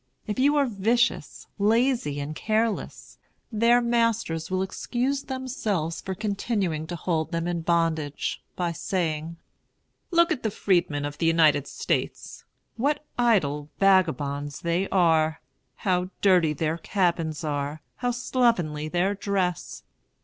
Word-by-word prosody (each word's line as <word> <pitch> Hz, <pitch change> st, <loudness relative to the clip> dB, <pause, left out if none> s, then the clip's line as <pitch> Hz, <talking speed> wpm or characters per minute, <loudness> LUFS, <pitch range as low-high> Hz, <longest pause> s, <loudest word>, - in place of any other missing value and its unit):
If 210 Hz, +3 st, -3 dB
you 285 Hz, +3 st, +4 dB
are 285 Hz, -1 st, +4 dB
vicious, 230 Hz, +1 st, 0 dB
lazy, 225 Hz, -, +2 dB
and 145 Hz, +2 st, -4 dB
careless, 220 Hz, +3 st, -2 dB, 0.3 s
their 230 Hz, +2 st, +4 dB
masters 230 Hz, -8 st, 0 dB
will 185 Hz, 0 st, 0 dB
excuse 250 Hz, +8 st, -2 dB
themselves 220 Hz, -, -3 dB
for 190 Hz, -, -4 dB
continuing 200 Hz, -6 st, -2 dB
to 175 Hz, -, -4 dB
hold 165 Hz, -1 st, -1 dB
them 165 Hz, -1 st, -1 dB
in 175 Hz, -1 st, -2 dB
bondage, 160 Hz, -3 st, 0 dB
by 175 Hz, -2 st, -1 dB
saying: 165 Hz, -2 st, -2 dB, 0.7 s
"Look 340 Hz, 0 st, +4 dB
at 300 Hz, -, -1 dB
the 220 Hz, -, 0 dB
freedmen 170 Hz, -8 st, 0 dB
of 145 Hz, 0 st, -6 dB
the 165 Hz, -, +2 dB
United 155 Hz, -4 st, +4 dB
States! -, -, -3 dB, 0.3 s
What 295 Hz, +5 st, 0 dB
idle 150 Hz, -12 st, +2 dB
vagabonds 150 Hz, -7 st, +2 dB
they 170 Hz, +3 st, 0 dB
are! 160 Hz, -4 st, +3 dB, 0.4 s
How 180 Hz, -1 st, 0 dB
dirty 180 Hz, -6 st, +4 dB
their 160 Hz, +2 st, -2 dB
cabins 170 Hz, -4 st, 0 dB
are! 145 Hz, 0 st, -3 dB
How 245 Hz, -, -1 dB
slovenly 230 Hz, -, +1 dB
their 180 Hz, +5 st, +1 dB
dress! 190 Hz, -4 st, -2 dB
180 Hz, 130 wpm, -26 LUFS, 160-230 Hz, 0.7 s, you